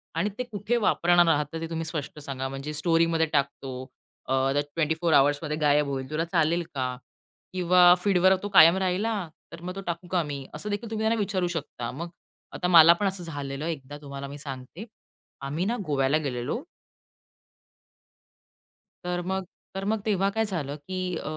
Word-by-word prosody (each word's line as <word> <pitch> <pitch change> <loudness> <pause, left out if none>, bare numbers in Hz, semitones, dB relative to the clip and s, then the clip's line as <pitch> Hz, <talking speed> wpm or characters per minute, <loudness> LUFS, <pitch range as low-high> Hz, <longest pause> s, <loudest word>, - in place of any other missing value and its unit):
आणि 190 +6 +1
ते 250 - -1
कुठे 225 0 -2
वापरणार 175 -5 +3
आहात? 150 0 0
ते 165 0 -4
तुम्ही 165 0 -3
स्पष्ट 155 -2 -5
सांगा. 135 -2 -4
"म्हणजे 135 +3 -6
स्टोरीमध्ये 165 +1 +2
टाकतो, 140 -2 -1 0.5
अ, 130 - -1 0.2
त्या 145 - +2
24 160 +1 +1
आवर्समध्ये 145 +2 +3
गायब 150 -1 +3
होईल, 130 0 -4
तुला 160 +2 -1
चालेल 170 0 +1
का?" 130 -1 -2 0.6
किंवा 180 0 +6
"फीडवर 190 -1 +4
तो 205 - -3
कायम 170 -1 +7
राहिल 190 +2 0
हा, 205 -6 -2 0.2
तर 165 - -10
मग 180 +2 -6
तो 195 - -5
टाकू 170 +1 -4
का 180 -2 +2
मी?" 140 -2 -6
असं 210 - -5
देखील 205 +2 -3
तुम्ही 220 0 -2
त्यांना 225 0 +2
विचारू 190 -3 0
शकता. 120 -5 -5
मग 170 +6 -6 0.5
आता 180 - -1
मला 170 -1 +9
पण 200 +3 -1
असं 190 -2 -3
झालेलं 145 -3 -5
आहे 165 - 0
एकदा, 145 0 -10
तुम्हाला 140 -1 -7
मी 140 +1 -8
सांगते, 140 - -8 0.6
आम्ही 155 +7 -2
ना 235 +3 0
गोव्याला 140 0 +2
गेलेलो. 140 - -3 2.4
तर 180 0 -2
मग 190 0 -2 0.3
तर 195 - -3
मग 220 +1 0
तेव्हा 195 -2 +2
काय 220 +2 0
झालं, 150 -8 -3
की 185 +3 -4
अ, - - -6
165 Hz, 175 wpm, -26 LUFS, 145-185 Hz, 2.4 s, मला